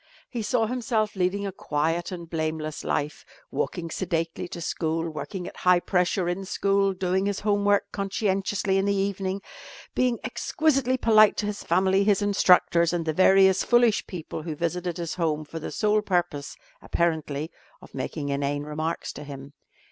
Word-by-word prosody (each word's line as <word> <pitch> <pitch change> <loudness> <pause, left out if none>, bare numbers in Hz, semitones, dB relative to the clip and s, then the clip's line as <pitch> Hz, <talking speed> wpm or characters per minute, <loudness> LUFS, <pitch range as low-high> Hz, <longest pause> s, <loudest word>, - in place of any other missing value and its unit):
He 240 - -3
saw 225 +1 +1
himself 225 -3 -1
leading 190 +2 0
a 195 - -3
quiet 165 0 -1
and 170 -2 -6
blameless 155 -1 -3
life, 145 +1 -2 0.3
walking 165 -3 -3
sedately 165 -1 -2
to 175 - -7
school, 165 0 -2
working 155 +4 -5
at - - -10
high 180 -1 +4
pressure 180 0 0
in 175 +2 -2
school, 195 +1 +1
doing 185 +1 0
his 200 -1 -2
homework 205 -1 +2
conscientiously 195 -1 0
in 195 - 0
the 200 0 +1
evening, 195 0 -2 0.5
being 250 -2 +1
exquisitely 275 -5 +1
polite 215 -3 +5
to - - -1
his 210 0 -3
family, 190 +1 +3
his 205 -1 +2
instructors, 180 -4 +4
and 170 -2 -1
the 160 - 0
various 190 +2 +5
foolish 240 -2 +3
people 165 -3 -6
who 155 -1 -5
visited 175 +2 -2
his 170 -2 -3
home 155 -3 -1
for 165 +2 -7
the - - -5
sole 215 0 +1
purpose 175 -8 -1 0.3
(apparently) 160 -2 -1 0.3
of - - -16
making 145 -3 -4
inane 140 +1 -1
remarks 155 +2 -3
to 150 - -8
him. 140 -1 -9
180 Hz, 165 wpm, -26 LUFS, 160-200 Hz, 0.5 s, polite